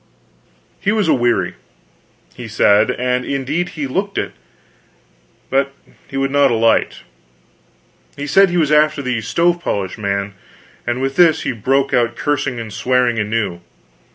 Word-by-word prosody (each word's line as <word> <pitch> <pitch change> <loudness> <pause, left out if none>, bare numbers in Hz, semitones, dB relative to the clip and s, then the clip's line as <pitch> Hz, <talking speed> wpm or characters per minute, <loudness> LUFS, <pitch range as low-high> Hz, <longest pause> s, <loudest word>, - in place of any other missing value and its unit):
He 200 - 0
was 215 -4 +1
aweary, 120 - +1 0.8
he 120 - -8
said, 105 -1 +3
and 125 0 -1
indeed 140 +7 -2
he 150 - -2
looked 195 +9 -3
it; - - -2 1.2
but 135 +1 +1 0.3
he 135 - -6
would 135 0 0
not 140 -1 +4
alight. 115 -1 +1 1.2
He 145 - -4
said 195 +6 +4
he 175 - -1
was 155 -3 +2
after 150 -1 +3
the 125 -3 -1
stove 170 +9 +1
polish 100 - -3
man; 100 -1 -2 0.5
and 120 +2 -1
with 135 0 -2
this 170 -3 +4
he - - -1
broke 135 +4 0
out 120 -1 +2
cursing 140 -4 -1
and 110 -2 -7
swearing 125 -2 +1
anew. 105 -4 -2
130 Hz, 145 wpm, -18 LUFS, 115-145 Hz, 1.2 s, not